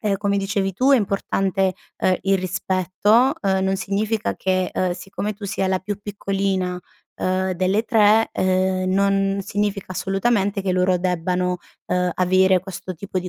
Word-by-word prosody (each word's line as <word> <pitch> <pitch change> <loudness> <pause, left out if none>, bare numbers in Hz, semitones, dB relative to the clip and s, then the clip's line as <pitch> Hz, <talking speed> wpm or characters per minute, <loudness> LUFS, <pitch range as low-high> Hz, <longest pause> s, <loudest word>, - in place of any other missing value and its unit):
ehm, 210 -3 0
come 200 0 0
dicevi 195 0 -1
tu 260 +9 +3
è - - +7
importante, 195 -2 0 0.2
ehm, 185 - +2
il 195 0 +2
rispetto, 190 +6 +1
uhm, 190 -1 +2
non 190 0 +1
significa 210 +3 -1
che, 185 -1 0
uhm, 185 -1 0
siccome 195 +4 -5
tu 205 - -10
sia 195 -1 -1
la 185 0 0
più 205 +1 -4
piccolina, 195 -3 -2 0.4
uhm, 185 0 -1
delle 185 +4 +1
3, 220 -1 +4
uhm, 185 0 +1
non 195 0 +2
significa 205 0 -2
assolutamente 200 +1 0
che 190 -1 0
loro 180 0 +2
debbano, 180 0 0 0.3
uhm, 180 0 0
avere 185 +1 +3
questo 185 0 -7
tipo 185 +2 -4
di 180 0 -4
190 Hz, 160 wpm, -22 LUFS, 185-200 Hz, 0.4 s, è